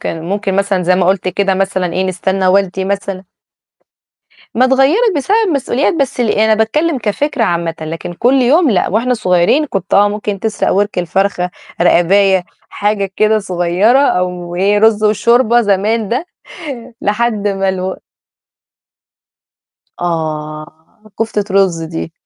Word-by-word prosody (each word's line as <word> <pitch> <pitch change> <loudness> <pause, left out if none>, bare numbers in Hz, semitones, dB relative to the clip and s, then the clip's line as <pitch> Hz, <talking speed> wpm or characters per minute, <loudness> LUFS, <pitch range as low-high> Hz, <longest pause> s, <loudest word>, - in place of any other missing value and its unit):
كان 165 -1 -5
ممكن 195 +1 -2
مثلًا 200 -2 0
زي 185 +1 +2
ما 180 -1 +1
قُلت 185 0 +1
كده 195 +1 0
مثلًا 190 -2 -1
إيه، 185 - -1
نستنى 190 +1 -1
والدي 190 0 +1
مثلًا 195 -1 -3 1.3
ما 250 +3 +3
اتغيّرت 295 - +3
بسبب 290 +9 0
المسئوليات، 280 -1 0
بس 275 -5 -2
ال 230 -3 +1
أنا 220 +1 +3
باتكلِّم 270 +8 0
كفكرة 245 +3 -1
عامةً، 170 -3 -1
لكن 165 +2 -6
كل 255 +8 +2
يوم 295 +4 +3
لأ. 195 - +1
وإحنا 235 +6 +1
صغيرين 180 - +2
كنت 195 -8 -3
آه، 205 +1 +5
ممكن 205 -1 -4
تسرق 220 0 -1
وِرْك 205 +1 0
الفرخة، 180 +1 -1 0.3
رقاباية 190 +2 +3 0.2
حاجة 205 -1 -2
كده 215 0 +3
صغيرة 185 +5 +1
أو 180 -9 -1
إيه، 200 +3 +2
رُز 215 0 +3
وشوربة 235 +3 +3
زمان 210 +1 0
ده 255 - -2 0.7
لحد 210 0 0
ما 195 -1 -1
الو 190 0 -2 2.0
آه، 160 +3 -5
كُفتة 220 -2 -1
رُز 185 -4 +2
دي. 165 0 -6
200 Hz, 140 wpm, -14 LUFS, 180-225 Hz, 2.0 s, آه